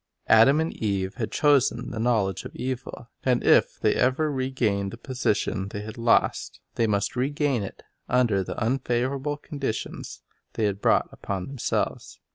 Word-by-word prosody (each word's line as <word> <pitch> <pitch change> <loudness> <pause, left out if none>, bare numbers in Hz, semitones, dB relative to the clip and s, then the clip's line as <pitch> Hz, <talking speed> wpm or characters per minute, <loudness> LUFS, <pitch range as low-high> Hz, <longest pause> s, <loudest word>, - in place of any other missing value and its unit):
Adam 115 +7 +6
and 160 +1 -1
Eve 100 -2 -1
had 115 -4 -3
chosen 140 -5 +2
the 110 - -5
knowledge 110 -5 +1
of - - -9
evil; 125 -2 -5
and 125 -2 +2
if - - +4
they - - +3
ever 145 +5 +1
regained 125 -7 -1
the 115 - -9
position 115 -6 -1
they 100 +1 -6
had 110 +1 -8
lost, 115 0 +1
they 115 - +1
must 100 +1 0
regain 140 -1 0
it 100 - -8 0.3
under 120 -6 +2
the - - -6
unfavorable 130 +4 -1
conditions 140 -6 -5 0.3
they 110 - -2
had 100 -1 0
brought - - +3
upon 95 -2 -4
themselves. 135 -3 -3
120 Hz, 155 wpm, -25 LUFS, 105-130 Hz, 0.3 s, Adam